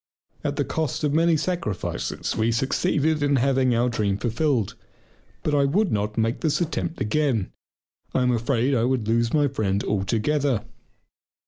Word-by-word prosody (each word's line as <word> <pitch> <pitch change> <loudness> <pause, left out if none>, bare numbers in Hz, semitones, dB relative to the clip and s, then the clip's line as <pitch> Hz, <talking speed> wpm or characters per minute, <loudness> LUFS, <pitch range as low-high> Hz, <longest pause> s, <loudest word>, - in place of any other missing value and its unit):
At - - -1
the - - 0
cost 160 -2 -2
of 145 -1 +1
many 165 +1 +3
sacrifices 160 - -3
we 110 +1 +1
succeeded 150 +4 +1
in 145 -1 +2
having 130 -1 +2
our 120 +2 +2
dream 105 -4 0
fulfilled. 120 0 0 0.7
But 150 - 0
I 140 -1 +4
would 185 +7 +1
not 105 +1 -1
make 115 +1 0
the - - +1
attempt 165 +1 -1
again. 120 -3 0 0.6
I 130 - +1
am 125 - +3
afraid 120 +2 +1
I 115 -3 +2
would 125 -3 0
lose 115 +1 +2
my 145 -2 +3
friend 105 -7 -1
altogether. 115 +5 0
130 Hz, 155 wpm, -24 LUFS, 110-150 Hz, 0.7 s, I